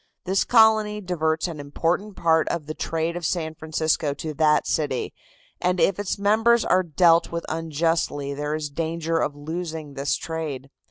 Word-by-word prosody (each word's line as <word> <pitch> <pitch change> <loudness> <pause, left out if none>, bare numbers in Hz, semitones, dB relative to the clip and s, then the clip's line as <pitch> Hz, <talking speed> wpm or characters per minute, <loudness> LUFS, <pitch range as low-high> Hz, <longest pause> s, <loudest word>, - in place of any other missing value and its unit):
This 190 +2 +2
colony 220 -2 +4
diverts 160 -4 -1
an 165 -4 -7
important 170 +8 -2
part 160 -2 +2
of 170 -3 -3
the 155 - -5
trade 165 +1 -2
of 175 - -5
San 160 -2 -1
Francisco 155 -2 -1
to 155 +1 -5
that 150 0 +3
city, 145 -5 -1 0.5
and 180 0 +1
if 195 +2 +2
its 205 0 -2
members 225 +4 +3
are 185 - +3
dealt 170 0 +3
with 170 0 -4
unjustly 160 -3 -1
there 150 +2 -2
is 150 -2 -4
danger 165 +1 -1
of 145 - -1
losing 160 0 -5
this 140 +1 -1
trade. 150 -5 -5
165 Hz, 165 wpm, -24 LUFS, 150-180 Hz, 0.5 s, colony